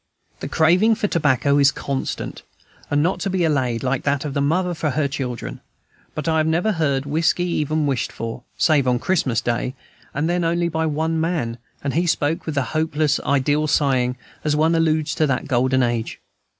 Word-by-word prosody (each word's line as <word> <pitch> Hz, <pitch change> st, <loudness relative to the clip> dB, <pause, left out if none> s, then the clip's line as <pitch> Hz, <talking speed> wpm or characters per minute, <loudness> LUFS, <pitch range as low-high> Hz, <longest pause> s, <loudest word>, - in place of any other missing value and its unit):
The -, -, -5 dB
craving 180 Hz, +8 st, +4 dB
for 210 Hz, -1 st, -1 dB
tobacco 145 Hz, -, +2 dB
is 140 Hz, 0 st, +5 dB
constant, 135 Hz, -1 st, -4 dB, 0.5 s
and 145 Hz, 0 st, +2 dB
not 180 Hz, +1 st, 0 dB
to 195 Hz, -, -2 dB
be 185 Hz, -2 st, 0 dB
allayed, 130 Hz, -7 st, 0 dB
like 130 Hz, 0 st, 0 dB
that 140 Hz, 0 st, 0 dB
of 145 Hz, -, -4 dB
a 140 Hz, -, +1 dB
mother 175 Hz, +5 st, +1 dB
for 155 Hz, -2 st, -1 dB
her 145 Hz, +1 st, 0 dB
children; 130 Hz, -4 st, -5 dB, 0.5 s
but -, -, -4 dB
I 160 Hz, -1 st, +2 dB
have 155 Hz, -, +1 dB
never 170 Hz, +7 st, +1 dB
heard 140 Hz, -7 st, 0 dB
whiskey 160 Hz, +4 st, +1 dB
even 155 Hz, -3 st, 0 dB
wished 135 Hz, -5 st, -1 dB
for, 115 Hz, +1 st, -6 dB, 0.2 s
save 145 Hz, -5 st, +3 dB
on 125 Hz, -1 st, +3 dB
Christmas 130 Hz, -6 st, 0 dB
Day, 120 Hz, +2 st, -2 dB, 0.4 s
and 145 Hz, +3 st, -1 dB
then 175 Hz, 0 st, 0 dB
only 170 Hz, +1 st, +1 dB
by 160 Hz, 0 st, -1 dB
one 160 Hz, +2 st, 0 dB
man, 150 Hz, -9 st, -2 dB, 0.2 s
and 140 Hz, -, -1 dB
he 175 Hz, +3 st, +1 dB
spoke 155 Hz, 0 st, 0 dB
with 155 Hz, -3 st, -3 dB
a 140 Hz, -, +3 dB
hopeless 155 Hz, -2 st, +1 dB
ideal 145 Hz, +3 st, +1 dB
sighing, 130 Hz, -4 st, +1 dB, 0.3 s
as 150 Hz, -1 st, +1 dB
one 160 Hz, +2 st, +3 dB
alludes 160 Hz, -2 st, +1 dB
to 155 Hz, -, +1 dB
the 130 Hz, -2 st, 0 dB
Golden 130 Hz, 0 st, +2 dB
Age. 120 Hz, -2 st, -2 dB
150 Hz, 190 wpm, -21 LUFS, 135-165 Hz, 0.5 s, is